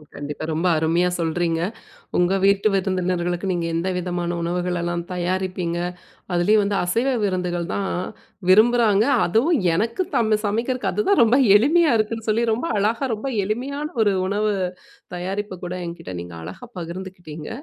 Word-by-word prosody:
கண்டிப்பா. 145 Hz, +1 st, -6 dB
ரொம்ப 165 Hz, +3 st, 0 dB
அருமையா 170 Hz, +3 st, +2 dB
சொல்றீங்க. 165 Hz, 0 st, 0 dB, 0.6 s
உங்க 180 Hz, +2 st, +3 dB
வீட்டு 200 Hz, +2 st, +4 dB
விருந்தினர்களுக்கு 180 Hz, -1 st, -1 dB
நீங்க 170 Hz, -2 st, -1 dB
எந்த 170 Hz, +3 st, -1 dB
விதமான 175 Hz, -1 st, -2 dB
உணவுகளெல்லாம் 175 Hz, 0 st, -1 dB
தயாரிப்பீங்க. 180 Hz, -1 st, -2 dB, 0.5 s
அதுலேயும் 205 Hz, +5 st, +3 dB
வந்து 200 Hz, 0 st, 0 dB
அசைவ 230 Hz, +9 st, 0 dB, 0.2 s
விருந்துகள் 180 Hz, -2 st, -1 dB
தான் 195 Hz, -1 st, -1 dB, 0.6 s
விரும்புறாங்க, 220 Hz, 0 st, +5 dB, 0.2 s
அதுவும் 250 Hz, -, +2 dB, 0.2 s
எனக்கு 230 Hz, -, 0 dB
தம் 220 Hz, -2 st, +2 dB
சமைக்கிறதுக்கு 240 Hz, +5 st, -1 dB
அதுதான் 405 Hz, -2 st, +2 dB
ரொம்ப 230 Hz, +3 st, +5 dB, 0.2 s
எளிமையா 310 Hz, +6 st, +4 dB
இருக்குன்னு 220 Hz, +1 st, -2 dB
சொல்லி, 225 Hz, +2 st, +2 dB
ரொம்ப 245 Hz, +9 st, -1 dB
அழகா, 225 Hz, +6 st, +1 dB
ரொம்ப 220 Hz, +6 st, -5 dB, 0.2 s
எளிமையான 270 Hz, +8 st, -3 dB, 0.2 s
ஒரு 205 Hz, -2 st, +3 dB
உணவு 210 Hz, +2 st, 0 dB, 0.6 s
தயாரிப்ப 190 Hz, +1 st, -4 dB
கூட 180 Hz, +1 st, -4 dB
என்கிட்ட 170 Hz, -, -7 dB
நீங்க 85 Hz, -1 st, -9 dB
அழகா 245 Hz, -, -9 dB
பகிர்ந்துக்கிட்டீங்க. 170 Hz, -3 st, -7 dB
190 Hz, 135 wpm, -22 LUFS, 175-220 Hz, 0.6 s, விரும்புறாங்க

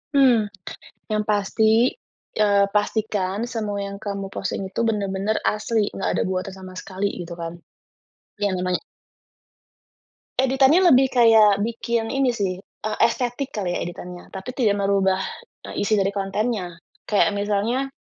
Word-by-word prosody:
Mmm, 245 Hz, -6 st, +5 dB, 0.6 s
yang 215 Hz, 0 st, +1 dB
pasti, 220 Hz, +3 st, +3 dB, 0.5 s
eee, 200 Hz, -1 st, +4 dB
pastikan 205 Hz, -1 st, 0 dB
semua 210 Hz, -4 st, -3 dB
yang 200 Hz, 0 st, -6 dB
kamu 200 Hz, -2 st, -5 dB
posting -, -, -3 dB
itu -, -, -3 dB
benar-benar 205 Hz, -1 st, 0 dB
asli 215 Hz, 0 st, 0 dB
nggak -, -, -2 dB
ada -, -, +2 dB
buatan 185 Hz, +1 st, -3 dB
sama 185 Hz, -1 st, -10 dB
sekali 195 Hz, +1 st, -3 dB
gitu 170 Hz, 0 st, -7 dB
kan, 170 Hz, 0 st, -6 dB, 0.8 s
iya 205 Hz, -2 st, 0 dB
namanya. 180 Hz, 0 st, -1 dB, 1.6 s
Editannya 270 Hz, +6 st, +5 dB
lebih 265 Hz, +1 st, +5 dB
kayak 220 Hz, -4 st, +5 dB
bikin 230 Hz, 0 st, -2 dB
ini 270 Hz, -2 st, +2 dB
sih, 200 Hz, -6 st, -1 dB
eee, 215 Hz, +2 st, -6 dB
estetik 250 Hz, +2 st, -3 dB
kali 185 Hz, -4 st, -3 dB
ya -, -, -2 dB
editannya 175 Hz, +1 st, -7 dB
tapi 195 Hz, +6 st, -7 dB
tidak 215 Hz, -6 st, +2 dB
merubah, 195 Hz, -1 st, +2 dB, 0.5 s
eee, -, -, -4 dB
isi 215 Hz, +1 st, +2 dB
dari 195 Hz, 0 st, +1 dB
kontennya, 195 Hz, -2 st, -2 dB, 0.3 s
kayak 210 Hz, 0 st, +3 dB
misalnya 210 Hz, +6 st, 0 dB
205 Hz, 135 wpm, -23 LUFS, 195-230 Hz, 1.6 s, Mmm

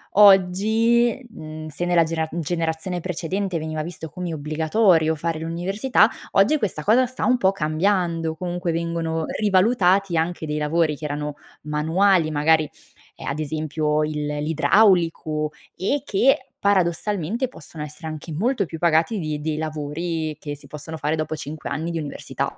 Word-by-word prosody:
oggi 215 Hz, +5 st, +5 dB
uhm, 155 Hz, -4 st, -8 dB
se 155 Hz, +4 st, -3 dB
nella 175 Hz, -1 st, +4 dB
genera 160 Hz, 0 st, -2 dB
generazione 165 Hz, +1 st, -2 dB
precedente 180 Hz, +2 st, -2 dB
veniva 155 Hz, -1 st, -3 dB
visto 160 Hz, 0 st, -6 dB
come 180 Hz, -2 st, -5 dB
obbligatorio 160 Hz, +2 st, +2 dB
fare 165 Hz, +1 st, -2 dB
l'università, 195 Hz, +8 st, +2 dB, 0.2 s
oggi 200 Hz, +10 st, +4 dB
questa 190 Hz, -, -2 dB
cosa 245 Hz, +7 st, +4 dB
sta 255 Hz, +1 st, -3 dB
un 255 Hz, 0 st, +4 dB
po' 190 Hz, -3 st, +4 dB
cambiando, 165 Hz, -1 st, 0 dB
comunque 175 Hz, 0 st, -3 dB
vengono 165 Hz, -1 st, -2 dB
rivalutati 195 Hz, -2 st, +3 dB
anche 165 Hz, 0 st, -1 dB
dei 150 Hz, 0 st, -2 dB
lavori 155 Hz, +1 st, +1 dB
che 155 Hz, -, -8 dB
erano 150 Hz, 0 st, -3 dB, 0.3 s
manuali, 160 Hz, +4 st, +2 dB
magari, 155 Hz, 0 st, +3 dB, 0.5 s
ehm, -, -, -10 dB
ad 140 Hz, +2 st, -2 dB
esempio 155 Hz, 0 st, -1 dB
il 150 Hz, -1 st, -2 dB
l'idraulico 160 Hz, -1 st, +2 dB, 0.2 s
e 270 Hz, +9 st, -1 dB
che, 255 Hz, +4 st, +3 dB, 0.3 s
paradossalmente 200 Hz, -, +1 dB
possono 160 Hz, -10 st, -9 dB
essere 150 Hz, +2 st, -8 dB
anche 155 Hz, +1 st, -7 dB
molto 205 Hz, -, 0 dB
più 165 Hz, -, -7 dB
pagati 170 Hz, +6 st, +2 dB
di 155 Hz, -3 st, -3 dB
dei 155 Hz, 0 st, -2 dB
lavori 155 Hz, +1 st, -3 dB
che 145 Hz, -1 st, -5 dB
si 145 Hz, -, -16 dB
possono 150 Hz, +2 st, -7 dB
fare 155 Hz, 0 st, -1 dB
dopo 155 Hz, 0 st, -2 dB
5 155 Hz, +1 st, -6 dB
anni 160 Hz, +4 st, -3 dB
di 165 Hz, -, -2 dB
università. 145 Hz, -2 st, -4 dB
165 Hz, 150 wpm, -23 LUFS, 155-190 Hz, 0.5 s, oggi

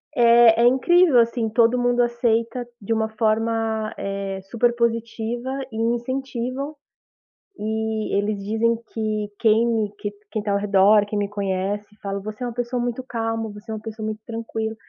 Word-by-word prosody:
É 235 Hz, -2 st, +6 dB
é -, -, +5 dB
incrível, 290 Hz, +3 st, +5 dB
assim, 230 Hz, -1 st, +1 dB
todo 230 Hz, +2 st, +3 dB
mundo 245 Hz, 0 st, +2 dB
aceita 235 Hz, 0 st, 0 dB
de 205 Hz, +3 st, -1 dB
uma 220 Hz, 0 st, 0 dB
forma, 220 Hz, 0 st, 0 dB
eh, 195 Hz, -1 st, -4 dB
super 240 Hz, 0 st, +2 dB
positiva 235 Hz, +1 st, -1 dB, 0.2 s
e 220 Hz, -, -7 dB
incentivam, 255 Hz, +4 st, -2 dB, 0.8 s
e 220 Hz, 0 st, -2 dB
eles 205 Hz, 0 st, -1 dB
dizem 225 Hz, +3 st, +1 dB, 0.2 s
que 215 Hz, -2 st, -2 dB
quem 225 Hz, +1 st, +4 dB
me 220 Hz, -3 st, 0 dB
que 205 Hz, -, -4 dB, 0.2 s
quem 215 Hz, -, -2 dB
tá 205 Hz, 0 st, -2 dB
ao 200 Hz, -, +2 dB
redor, 200 Hz, +1 st, +4 dB
quem 205 Hz, 0 st, -3 dB
me 200 Hz, -1 st, -1 dB
conhece, 200 Hz, 0 st, -2 dB
fala: 200 Hz, 0 st, -3 dB
"Você 215 Hz, +4 st, -6 dB
é -, -, -1 dB
uma 240 Hz, -, -5 dB
pessoa 245 Hz, +1 st, -2 dB
muito 245 Hz, +1 st, -3 dB
calma, 225 Hz, -2 st, -3 dB
você 210 Hz, +2 st, -13 dB
é -, -, -2 dB
uma 215 Hz, -, -7 dB
pessoa 220 Hz, 0 st, -6 dB
muito 215 Hz, 0 st, -4 dB
tranquila", 225 Hz, -1 st, -4 dB
225 Hz, 170 wpm, -23 LUFS, 215-240 Hz, 0.8 s, É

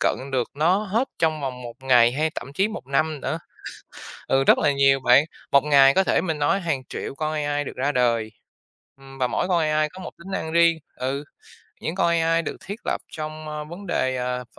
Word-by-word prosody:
cận -, -, +2 dB, 0.2 s
được 125 Hz, -2 st, 0 dB
nó 170 Hz, +6 st, +3 dB
hết 220 Hz, +6 st, -1 dB
trong 155 Hz, -2 st, +1 dB
vòng 130 Hz, -2 st, -5 dB
1 120 Hz, -1 st, -8 dB
ngày 120 Hz, -2 st, +5 dB
hay 155 Hz, +3 st, 0 dB
thậm 140 Hz, -, -7 dB
chí 195 Hz, +5 st, +2 dB
1 215 Hz, -, -8 dB
năm 150 Hz, +2 st, 0 dB
nữa. 160 Hz, -, -2 dB, 0.9 s
Ừ, 135 Hz, 0 st, +3 dB
rất -, -, +5 dB
là 145 Hz, -, +3 dB
nhiều 135 Hz, 0 st, +4 dB
bạn, 130 Hz, +2 st, +5 dB, 0.3 s
1 140 Hz, -, +5 dB
ngày 140 Hz, -2 st, +6 dB
có 190 Hz, -, +3 dB
thể, -, -, +2 dB
mình 160 Hz, -4 st, -2 dB
nói, 145 Hz, +7 st, +2 dB
hàng 160 Hz, -7 st, -1 dB
triệu -, -, -5 dB
con 155 Hz, +1 st, -2 dB
AI 145 Hz, -1 st, -1 dB
được -, -, -7 dB
ra 140 Hz, +3 st, 0 dB
đời, 115 Hz, -4 st, +1 dB, 0.7 s
ừm, 135 Hz, 0 st, -14 dB
và 125 Hz, -, +2 dB
mỗi 180 Hz, -, -1 dB
con 180 Hz, -2 st, +2 dB
AI 155 Hz, 0 st, +1 dB
có 185 Hz, -, -13 dB
một -, -, -7 dB
tính 190 Hz, +3 st, -11 dB
năng 160 Hz, -4 st, -3 dB
riêng. 170 Hz, 0 st, +4 dB, 0.2 s
Ừ, 135 Hz, +3 st, -3 dB, 0.6 s
những 160 Hz, -, -3 dB
con 190 Hz, -2 st, +2 dB
AI 165 Hz, 0 st, +2 dB
được -, -, -5 dB
thiết 205 Hz, +4 st, -6 dB
lập -, -, -1 dB
trong, 155 Hz, 0 st, -6 dB
ơ, 150 Hz, 0 st, -5 dB
vấn 175 Hz, +6 st, -10 dB
đề, 130 Hz, -7 st, 0 dB
ờ, 125 Hz, 0 st, -3 dB
v -, -, -16 dB
150 Hz, 225 wpm, -23 LUFS, 135-165 Hz, 0.9 s, ngày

